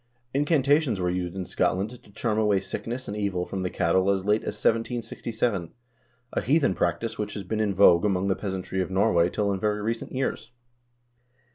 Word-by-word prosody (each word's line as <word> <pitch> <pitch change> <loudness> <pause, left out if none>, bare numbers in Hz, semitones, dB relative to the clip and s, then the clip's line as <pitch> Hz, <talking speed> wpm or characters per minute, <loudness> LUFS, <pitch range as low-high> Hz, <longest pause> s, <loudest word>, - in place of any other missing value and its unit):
1 135 - +1
Incantations 145 - +2
were 90 -1 0
used 90 0 -3
in 95 -1 -3
Scotland 95 +5 0
to 120 -4 -14
charm 110 +1 -1
away 105 -3 +3
sickness 120 +6 -5
and 100 - -4
evil 100 -4 -1
from 95 - -4
the 90 - -1
cattle 95 +4 +2
as 95 -1 +1
late 105 +1 +3
as - - -4
1767, 115 -4 -1 0.6
a - - 0
heathen 140 - +3
practice 85 +7 -1
which 105 -1 -3
has 100 - -4
been 110 +4 -3
in 105 -3 0
vogue 90 -3 +6
among 100 -2 +1
the 95 - +2
peasantry 95 -1 -3
of 90 - -2
Norway 90 -3 +3
till 100 +2 0
in 95 - -3
very 105 +1 0
recent 115 +1 -3
years. 130 -4 -2
100 Hz, 190 wpm, -26 LUFS, 95-115 Hz, 0.6 s, vogue